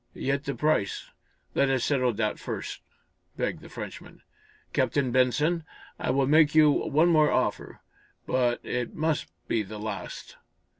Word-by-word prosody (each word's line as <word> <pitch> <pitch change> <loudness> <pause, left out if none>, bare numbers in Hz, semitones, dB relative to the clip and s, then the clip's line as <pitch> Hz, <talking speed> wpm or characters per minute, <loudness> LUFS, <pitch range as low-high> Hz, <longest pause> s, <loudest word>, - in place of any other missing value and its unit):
"Yet 140 +1 -1
the 140 - -2
price? 150 -10 0 0.4
Let 140 - +2
us 130 -2 +1
settle 130 -4 +2
that 105 0 -1
first," - - -5 0.6
begged - - -2
the - - -12
Frenchman. - - -9 0.5
"Captain 135 -4 +1
Benson, 150 +7 +2 0.4
I - - -2
will 135 +1 +2
make 150 +2 +4
you 155 -1 +7
one 155 +4 +2
more 155 -3 +5
offer - - -1 0.4
but 125 -2 +1
it 125 -1 -3
must 155 - 0 0.2
be 115 - +1
the 105 +1 -7
last. 110 +1 -6
140 Hz, 145 wpm, -27 LUFS, 125-150 Hz, 0.6 s, you